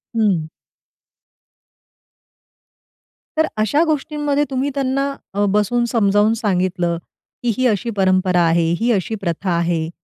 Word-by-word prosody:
हं. 195 -8 +1 2.9
तर 315 - +3
अशा 220 +10 +2
गोष्टींमध्ये 295 -1 0
तुम्ही 270 +1 -1
त्यांना, 275 +1 0 0.2
अ, 205 +1 +1
बसवून 210 +4 +1
समजावून 210 -1 +3
सांगितलं, 180 -5 0 0.5
की 240 - +2
"ही 255 - +1
अशी 220 +1 0
परंपरा 185 -2 +3
आहे, 170 0 +3 0.2
ही 235 +1 +2
अशी 210 +1 0
प्रथा 175 +2 -2
आहे, 170 -2 0
210 Hz, 115 wpm, -19 LUFS, 185-255 Hz, 2.9 s, तर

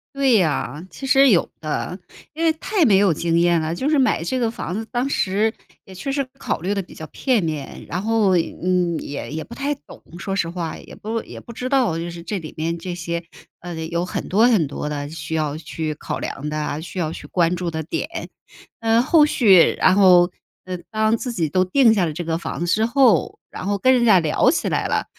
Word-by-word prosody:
对 275 -2 +3
呀， 155 - -1
其 270 - -8
实 270 0 +5
有 180 -7 +3
的， 160 +4 -3 0.3
因 320 +2 -4
为 325 - +5
太 375 +4 0
没 210 -9 +5
有 195 -3 +4
经 170 +2 0
验 170 -1 +3
了。 160 +1 -2
就 260 - -2
是 305 -2 +3
买 260 -10 +2
这 255 +10 -1
个 235 -2 +1
房 225 -6 -5
子 215 +4 -3
当 245 +2 0
时 215 -4 +1 0.3
也 190 - -12
确 190 +9 -4
实 275 0 0 0.2
考 - - -2
虑 190 +4 -1
得 200 - -1
比 180 - -14
较 160 - -7
片 240 - 0
面， 155 -4 -5
然 180 - -3
后 215 -3 +2
嗯 175 0 0
也 145 - -6
也 155 +1 -4
不 - - -12
太 280 +4 -2
懂 280 - -15 0.2
说 195 +2 -3
实 170 -4 0
话， 170 -2 -4
也 - - -12
不 225 +2 -4
也 - - -10
不 235 - -11
知 250 +2 -4
道， 255 - +2
就 170 +1 -4
是 170 0 -9
这 190 +4 -3
里 155 -3 -9
面 165 +2 -2
这 175 +1 -5
些 170 -1 -4 0.4
呃 175 0 -7
有 170 +1 -2
很 180 - -4
多 220 +5 +4
很 215 -10 +3
多 145 +1 -5
的 145 -1 -4
需 160 0 -5
要 150 -2 -1
去 155 0 -4
考 - - -5
量 150 +3 -5
的 155 - -3
啊， 150 0 -3
需 175 +3 -9
要 160 -3 -1
去 - - -9
关 175 -1 +1
注 175 -1 -3
的 160 0 -3
点。 160 - -5 0.5
嗯 230 +1 +3
后 300 +2 +5
续 200 - +5
然 185 - +5
后 180 -3 +6 0.3
呃 185 0 -4
当 215 +2 +2
自 245 - -4
己 170 -8 -1
都 185 +5 +2
定 225 +5 +4
下 195 -5 +2
了 160 - -3
这 175 +3 -4
个 165 0 -2
房 - - -5
子 - - 0
之 215 +6 +2
后， 250 -2 +3
然 - - -6
后 200 0 +1
跟 255 +7 +4
人 245 -2 +3
家 205 -5 +6
聊 155 -3 +2
起 - - 0
来 - - 0
了， - - 0
180 Hz, 255 characters per minute, -21 LUFS, 165-230 Hz, 0.5 s, 后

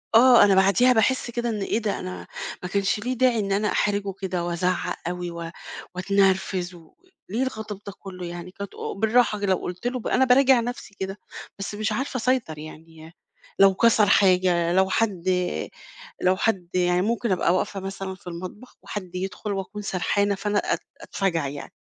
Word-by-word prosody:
آه 245 +1 +8
أنا 200 -1 +5
بَعدِيها 200 +7 +5
باحس 240 +2 +1
كده 240 0 -2
إن 215 -2 -2
إيه 215 +3 0
ده 210 -3 -2
أنا 185 0 -7 0.4
ما 180 - -4
كانش 200 +2 +1
ليه 250 +4 -2
داعي 250 -2 +2
إن 200 -1 -2
أنا 210 +2 +1
أحرِجه 200 -1 0
كده 180 -2 -2
وأزعّق 175 +1 -1
أوي 175 0 -3
و 170 0 -6 0.4
وأتنرفز، 190 -1 +1
و 165 -2 -17 0.4
ليه 235 +6 0
الغضب 220 -5 -5
ده 200 - -5
كلّه 185 -2 -8
يعني، 175 +1 -7
كانت 200 +1 -8
او - - -5
بالراحة 220 +1 +2
كده 200 - -1
لو - - +1
قُلت 180 +7 -5
له، 250 -1 -2
أنا 265 - +4
باراجِع 260 0 +5
نَفسي 235 -4 -5
كده 195 +1 -4 0.4
بس 200 +1 -4
مش 215 +1 -1
عارفة 260 +4 -2
أسيطر 240 -10 0
يعني، 160 +1 -11 0.5
لو 195 -1 +7
كَسَر 225 +1 +4
حاجة 180 -3 +3
لو 190 +1 +3
حد 195 -4 0 1.0
لو 185 +1 +3
حد 195 -6 0
يعني 180 0 +2
ممكن 230 +1 0
أبقى 180 -1 +2
واقفة 195 +1 -1
مثلًا 195 0 -5
في 185 - -18
المطبخ 185 +8 -8
وحد 185 -3 -7
يدخُل 195 +3 -4
وأكون 195 +2 -5
سرحانة 200 +1 0
فأنا 205 +1 0
أت - - -1 0.2
أتفجَع 170 -7 -1
يعني، 140 0 -8
195 Hz, 180 wpm, -24 LUFS, 180-220 Hz, 1.0 s, آه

